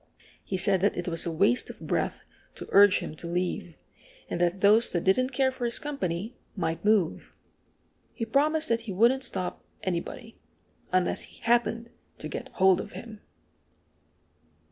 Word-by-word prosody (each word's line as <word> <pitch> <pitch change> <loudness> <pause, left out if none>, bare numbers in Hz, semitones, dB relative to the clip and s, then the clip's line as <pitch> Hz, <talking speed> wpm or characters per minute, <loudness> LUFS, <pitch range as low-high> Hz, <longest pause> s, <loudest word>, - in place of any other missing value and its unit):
He 190 - -3
said 190 0 +2
that 200 - +1
it 175 - -3
was 165 -1 +3
a - - -1
waste 200 +10 +2
of - - -10
breath - - -2 0.3
to - - -8
urge 200 0 +7
him 155 - -6
to 170 - -3
leave, 175 -1 -3 0.6
and 175 - -2
that 175 +2 0
those 215 +3 +5
that 175 - -1
didn't 255 +7 +2
care 265 0 +1
for 260 -1 -8
his 235 0 +3
company 225 - -3 0.2
might 165 -4 -3
move. 210 -6 +1 0.8
He 230 - -3
promised 305 +6 +1
that 230 0 +2
he - - -2
wouldn't 235 +7 +3
stop 185 -7 -4 0.2
anybody 190 +5 -5 0.5
unless 185 -1 +1
he - - -17
happened 235 0 +1 0.3
to - - -6
get - - -6
hold 190 -1 +4
of 210 - -10
him! 220 -3 -10
205 Hz, 165 wpm, -27 LUFS, 180-235 Hz, 0.8 s, urge